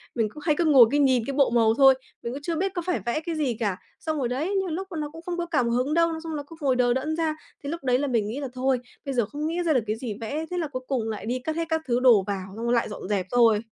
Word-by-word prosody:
mình 225 -2 +1
cứ 300 - -11
hay 305 -3 +2
cứ 345 - +2
ngồi, 275 -6 +8
cứ 290 - +2
nhìn 260 -4 +3
cái 275 - -3
bộ 275 0 +3
màu 230 -2 +4
thôi, 270 +2 +7 0.3
mình 235 - -3
cũng 280 - -6
chưa 330 +3 -2
biết 380 +4 -1
có 350 - -2
phải 360 -1 0
vẽ 240 +6 0
cái 330 +1 -4
gì 280 -6 0
cả. 205 -5 -1 0.2
Xong 315 -1 -2
rồi 265 -4 0
đấy, 300 +11 -2
nhiều 385 -1 +1
lúc 375 +4 -4
mà 335 - -5
nó 300 -1 -3
cũng 325 +2 -11
không 350 +1 -4
có 345 - -1
cảm 275 -8 +1
hứng 255 +5 0
đâu, 335 0 +3
nó 320 - -5
xong 325 -1 -4
nó 290 - -4
cứ 330 - -11
ngồi 270 -3 +2
đờ 245 -1 +3
đẫn 305 +5 -1
ra 320 -1 0 0.3
thì 280 - -4
lúc 335 -1 -5
đấy 250 -1 +2
là 285 - 0
mình 230 -5 +1
nghĩ 230 +6 -4
là 280 - -3
"Thôi, 260 0 +1 0.3
bây 275 - -2
giờ 240 -4 +2
không 295 +7 -4
nghĩ 330 +2 -2
ra 320 - +3
được 250 -5 +2
cái 215 - 0
gì 225 -1 -5
vẽ", 290 +8 -3
thế 360 - -2
là 330 -3 -1
cuối 255 -3 -5
cùng 240 -5 -1
lại 215 -2 -5
đi 245 +3 -1
cất 310 +5 -3
hết 335 0 -1
các 320 -1 +1
thứ 240 0 +2
đồ 240 -6 +6
vào, 195 -2 -3
xong 230 +2 -5
rồi 235 - +2
lại 235 -2 +1
dọn 210 - -7
dẹp 200 -3 0
thôi. 230 -3 +5
270 Hz, 335 wpm, -25 LUFS, 235-320 Hz, 0.3 s, ngồi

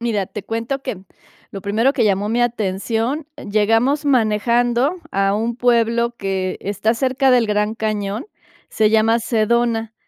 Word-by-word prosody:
Mira, 215 -5 -1
te 210 - -7
cuento 230 +5 -3
que 195 -9 -6 0.5
lo 195 - -7
primero 225 +7 +1
que - - +2
llamó 205 0 +1
mi 240 +2 +1
atención, 230 +5 -1 0.2
llegamos 225 +8 +2
manejando 240 - +2
a 195 +1 +1
un 230 +2 -2
pueblo 235 -1 +1
que 190 -2 -3
está 205 +3 0
cerca 265 +2 +1
del 245 -3 +4
Gran 210 +1 0
Cañón, 215 - -3 0.4
se 215 -1 +2
llama 225 +1 +3
Sedona. 230 0 0
225 Hz, 145 wpm, -19 LUFS, 210-240 Hz, 0.5 s, del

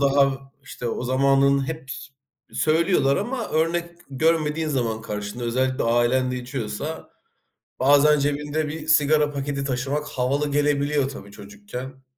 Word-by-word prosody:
daha 140 -1 +3 0.2
işte, 125 -2 -6
o 115 - -3
zamanın 135 +1 +3
hep 155 -3 -6
s 135 - -8 0.4
söylüyorlar 155 -3 +2
ama 240 +2 -3
örnek 170 +2 0 0.2
görmediğin 155 +2 +1
zaman 120 -6 -1
karşında; 105 +3 -5
özellikle 130 +2 0
ailen 120 +2 +2
de 125 - -2
içiyorsa, 125 +4 -5 0.7
bazen 145 +3 +5
cebinde 145 +2 -1
bir 155 +1 -6
sigara 150 -1 +3
paketi 140 0 -3
taşımak, 140 +3 -2
havalı 140 +2 -1
gelebiliyor, 145 -1 +1
tabii 100 -8 -10
çocukken. 105 +7 -9
140 Hz, 130 wpm, -23 LUFS, 130-150 Hz, 0.7 s, bazen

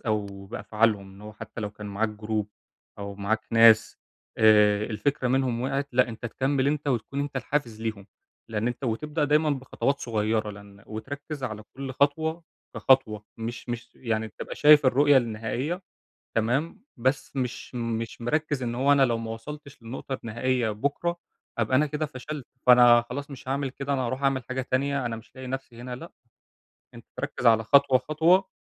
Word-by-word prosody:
أو 100 -3 -3
بأفعالهم، 105 -1 0
إن 95 +1 -15
هو 105 +1 -9
حتّى 105 +2 -9
لو 105 -1 -3
كان 105 0 -9
معاك 105 +2 -1
Group 105 -1 -1 0.5
أو 100 0 -6
معاك 100 +3 -1
ناس 115 -1 +6 0.4
آآ 105 -1 +5
الفكرة 125 +4 -1
منهم 130 -2 +1
وقعِت، 135 +2 -1
لأ 125 0 +4
أنت 115 +1 -6
تكمّل 135 +3 0
أنت 145 0 0
وتكون 130 +2 -1
أنت 145 -1 -3
الحافز 125 -4 -2
ليهم، 110 -3 -4 0.4
لإن 110 0 -2
أنت 125 +3 -5
وتبدأ 150 +6 -1
دايمًا 150 +1 +3
بخطوات 140 +1 -1
صغيّرة 110 -1 0
لإن 100 -1 -13
وتركّز 140 +6 -6
على 110 -3 -5
كلّ 135 -1 -5
خطوة 160 +5 +1 0.3
كخطوة 110 -6 +3
مش 115 +2 -6
مش، 120 0 -5
يعني 110 -3 -2
تبقى - - -8
شايف 150 -1 +7
الرؤية 140 +2 +5
النهائية، 120 - -1 0.5
تمام؟ 125 - 0
بس 130 +3 -1
مش 125 -1 -4
مش 115 -1 -3
مركّز 145 +2 -1
إن 120 -1 -2
هو 135 +4 +3
أنا 140 -1 +5
لو 120 -3 +1
ما 115 -1 -5
وصلتش 140 +4 -9
للنقطة 125 +3 -5
النهائية 120 +1 0
بُكره، 145 +10 -1 0.4
هابقى 115 +3 +2
أنا 150 +3 +4
كده 150 +1 -2
فشلت، 140 0 -7 0.2
فأنا 120 -1 +8
خلاص 140 +3 -5
مش 130 -2 -10
هاعمل 135 0 -1
كده 140 +2 -4
أنا 135 - 0
هاروح 130 +3 -3
أعمل 135 -2 +2
حاجة 130 +2 -3
تانية 140 0 +1
أنا 115 -1 -3
مش 110 - -14
لاقي 130 0 -8
نفْسي 130 -2 -6
هنا، 125 0 -6
لأ، 165 +7 -10 0.8
أنت - - -12
تركّز - - -4
على 110 -1 +6
خطوة، 140 +2 +5
خطوة، 165 +8 +3
125 Hz, 170 wpm, -26 LUFS, 110-140 Hz, 0.8 s, فأنا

